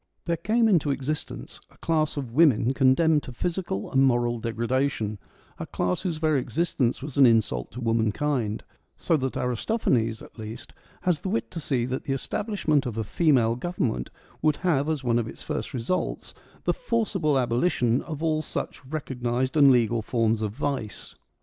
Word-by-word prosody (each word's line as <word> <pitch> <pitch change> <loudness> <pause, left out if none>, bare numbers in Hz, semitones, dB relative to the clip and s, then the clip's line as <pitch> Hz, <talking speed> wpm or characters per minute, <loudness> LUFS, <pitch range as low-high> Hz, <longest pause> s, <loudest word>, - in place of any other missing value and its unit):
There 170 - +1
came 225 +6 +2
into 170 -8 +3
existence 140 +2 -4
a - - -23
class 155 -2 0
of 130 -5 -4
women 130 -4 +4
condemned 150 +4 +4
to 125 - -9
physical 170 - -3
and 135 - +3
moral 120 -2 +2
degradation 115 -1 -1 0.2
— - - -31
a - - -5
class 90 0 -1
whose 175 -4 -2
very 155 -3 +2
existence 135 -3 -1
was 145 -2 -6
an 135 -2 +8
insult 110 - +2
to 125 - -6
womankind; 115 +1 0 0.3
so 165 - +1
that 130 -2 -2
Aristophanes, 120 - 0
at - - -15
least, 110 +1 -7 0.3
has 180 -4 +1
the 190 - -4
wit 225 +4 -2
to 170 - -5
see 130 -6 0
that 130 +1 -4
the 135 - 0
establishment 155 - 0
of 115 -2 -5
a 110 - 0
female 120 -2 +2
government 125 - -2 0.3
would 155 -2 +2
have 150 -4 +2
as 155 -4 -1
one 120 -1 +2
of 115 - -2
its - - -9
first 150 -1 -3
results 130 +7 -2 0.3
the - - +2
forcible 205 - 0
abolition 125 -1 +1
of 155 -1 -6
all 155 -1 +1
such 155 - -5
recognised 130 -3 -2
and 145 -3 +7
legal 115 -2 +3
forms 115 -1 +1
of 105 -2 -1
vice. 135 -4 -4
130 Hz, 175 wpm, -26 LUFS, 115-155 Hz, 0.3 s, an